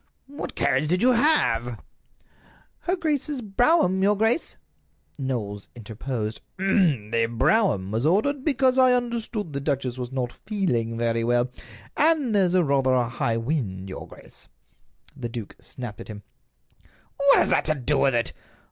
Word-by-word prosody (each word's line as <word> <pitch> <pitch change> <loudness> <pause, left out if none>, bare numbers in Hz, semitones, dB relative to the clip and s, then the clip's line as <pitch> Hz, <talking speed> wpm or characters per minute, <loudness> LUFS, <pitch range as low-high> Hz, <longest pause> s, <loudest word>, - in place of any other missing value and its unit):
"What 285 +2 -7
carriage 135 +3 +1
did 180 +6 +1
you 255 - +6
have?" 125 - +2 1.0
"Her 360 - -1
grace's 300 -4 -1
brougham, 220 - +2
your 205 +1 +3
grace." 225 +9 +1 0.6
Knowles 110 -7 -4
interposed: 110 0 -5 0.2
"The 135 - +1
brougham 115 - +2
was 110 +3 -1
ordered 240 - +1
because 265 -3 +2
I 255 -1 +6
understood 230 -7 -3
that 140 - -2
the - - -9
duchess 130 -3 -2
was 125 0 -5
not 125 -2 -2 0.2
feeling 120 - -1
very 115 0 0
well, 120 +1 +1 0.4
and 300 -6 +2
there's 185 -3 +3
rather 140 -6 +2
a 120 -2 +1
high 115 -1 -1
wind, 115 -8 -3
your 95 - -7
grace." - - -11 0.7
The 120 - -5
duke 115 -3 -7
snapped 120 -5 -8
at - - -10
him: 105 -2 -9 0.9
"What 280 0 +5
has - - +3
that - - +2
to 155 - +1
do 140 +1 0
with 135 -3 +3
it? 120 0 0
140 Hz, 150 wpm, -25 LUFS, -, 1.0 s, you